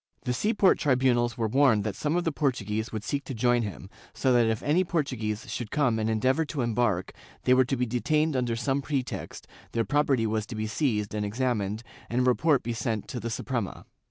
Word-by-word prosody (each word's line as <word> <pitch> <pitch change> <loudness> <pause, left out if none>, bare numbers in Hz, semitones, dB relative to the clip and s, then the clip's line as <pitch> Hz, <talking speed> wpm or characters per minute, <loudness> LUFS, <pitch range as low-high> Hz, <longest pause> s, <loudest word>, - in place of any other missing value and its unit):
The 125 - -1
sea 210 - +1
port 195 -2 +4
tribunals 125 -5 +2
were 115 -2 0
warned 120 -3 +4
that - - -3
some 150 +2 -1
of 175 - +1
the 165 - 0
Portuguese 110 -7 -1
would 110 -2 -4
seek 140 +3 -2
to 135 - -5
join 120 +1 +2
him, 100 -3 -6 0.3
so 130 -2 +2
that 120 -2 +4
if 110 -1 -1
any 160 +6 +3
Portuguese 125 - -2
should 120 -4 -4
come 130 -6 +1
and 110 0 0
endeavor 130 +8 +2
to 145 -2 -4
embark, 115 -6 0 0.3
they 125 - +4
were 130 0 +5
to 135 +1 -1
be 125 - +1
detained 150 +6 +1
under 120 -2 0
some 135 +4 0
pretext, 135 -3 -4 0.3
their 115 -1 +1
property 145 -5 +2
was 110 -1 -1
to 115 - -6
be 110 0 -2
seized 110 -3 -1
and 105 -1 -1
examined 110 -1 -1 0.3
and 120 +2 +1
a - - +2
report 130 +3 +3
be 120 - -2
sent 110 -2 -2
to 125 - -4
the 115 +1 -4
Suprema. 115 -2 -3
120 Hz, 215 wpm, -27 LUFS, 110-140 Hz, 0.3 s, were